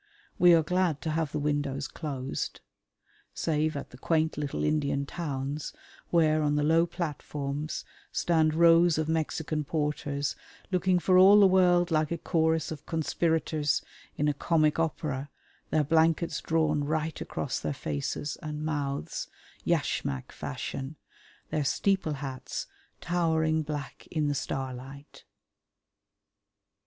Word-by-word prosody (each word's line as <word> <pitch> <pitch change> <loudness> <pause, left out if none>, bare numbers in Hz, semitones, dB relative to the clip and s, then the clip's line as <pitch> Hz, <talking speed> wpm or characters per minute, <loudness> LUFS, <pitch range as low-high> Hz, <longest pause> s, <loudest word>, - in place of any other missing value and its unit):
We 175 -1 +8
are 165 - +4
glad 180 -2 +1
to 160 - -1
have 155 -2 -1
the 155 - -2
windows 145 -2 -1
closed, 135 -4 -4 0.7
save 155 -1 0
at 140 - -7
the 125 - -13
quaint 160 +1 +1
little 145 -1 -3
Indian 140 -2 +1
towns 145 -2 -4 0.4
where 155 -2 +3
on 150 -1 +1
the 150 - +1
low 165 +3 +4
platforms 150 -3 -4 0.3
stand 160 -2 +2
rows 170 0 +6
of 155 -1 0
Mexican 160 -1 -1
porters 145 -2 -2 0.4
looking 185 0 +3
for 185 +1 +4
all 200 +3 +8
the 200 - +8
world 180 -2 +4
like 155 -1 +2
a 170 - -2
chorus 160 -1 +1
of 150 -2 -8
conspirators 160 -1 0 0.3
in 150 - +1
a 150 - +2
comic 155 +1 +2
opera, 145 -3 -2 0.4
their 155 - +2
blankets 160 +2 +2
drawn 155 -2 +1
right 155 +2 -2
across - - -3
their - - -2
faces 75 - -3
and 150 0 -4
mouths, 145 -3 -3 0.4
yashmak 65 -2 -1
fashion, 135 +3 -5 0.6
their 150 - 0
steeple 190 +3 +1
hats 135 -2 -5 0.4
towering 160 -2 +1
black 150 -2 -6
in 155 -3 0
the - - +1
starlight. 135 0 -6
155 Hz, 130 wpm, -29 LUFS, 145-165 Hz, 0.7 s, We